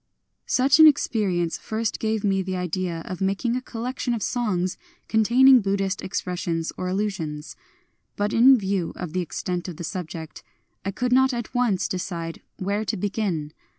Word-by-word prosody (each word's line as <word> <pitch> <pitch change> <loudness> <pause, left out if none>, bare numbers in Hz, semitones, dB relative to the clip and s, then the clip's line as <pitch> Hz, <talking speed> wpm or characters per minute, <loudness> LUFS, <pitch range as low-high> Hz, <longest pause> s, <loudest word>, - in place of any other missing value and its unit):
Such 270 +4 +4
an 315 - +11
experience 195 - +1
first 220 0 -2
gave 220 -1 -1
me 195 -2 +2
the 190 0 -3
idea 180 -2 -2
of 185 0 -6
making 200 +5 0
a 255 - -1
collection 245 0 -3
of 220 - -4
songs 185 -7 -1 0.3
containing 245 +4 +6
Buddhist 195 -1 -1
expressions 175 -3 -3
or 185 - -4
allusions. 180 -6 -3 0.6
But 205 +1 -1
in 255 +3 +7
view 195 -4 -1
of 175 -3 -6
the 185 - 0
extent 180 +1 -4
of 175 -4 -7
the - - -6
subject 165 -2 -6 0.4
I 195 - -2
could 245 +5 -1
not 265 0 +4
at 235 -2 -5
once 240 -7 +1
decide 170 -3 -4 0.2
where 200 +3 -1
to - - -2
begin. 185 -6 -2
195 Hz, 160 wpm, -24 LUFS, 180-230 Hz, 0.6 s, an